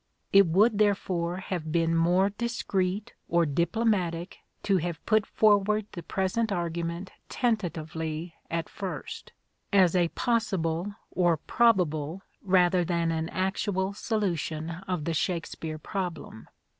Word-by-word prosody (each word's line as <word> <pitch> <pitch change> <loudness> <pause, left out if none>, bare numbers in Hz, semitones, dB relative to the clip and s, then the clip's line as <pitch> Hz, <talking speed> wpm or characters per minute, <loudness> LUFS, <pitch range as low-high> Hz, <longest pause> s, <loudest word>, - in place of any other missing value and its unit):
It 195 -2 +7
would 205 +6 +3
therefore 185 -4 +1
have 175 -4 -4
been 165 0 +2
more 180 +4 +3
discreet 205 -3 -2 0.2
or 170 0 +3
diplomatic 175 +2 0 0.2
to 195 -2 +3
have 170 -2 -4
put 215 -1 +3
forward 210 0 +3
the 175 - -7
present 190 +6 -1
argument 170 0 -3 0.2
tentatively 165 - -2 0.2
at 165 -1 -2
first, 195 -3 -6 0.4
as 190 -4 +5
a 175 -2 +4
possible 195 -4 -1 0.2
or 175 -3 +2
probable, 180 -5 +1 0.2
rather 180 -1 +3
than 170 -1 0
an 160 0 -2
actual 190 +1 -1
solution 170 - -2 0.2
of 180 -5 -2
the 165 - 0
Shakespeare 165 -1 -2
problem. 175 - -5
180 Hz, 120 wpm, -28 LUFS, 165-200 Hz, 0.4 s, It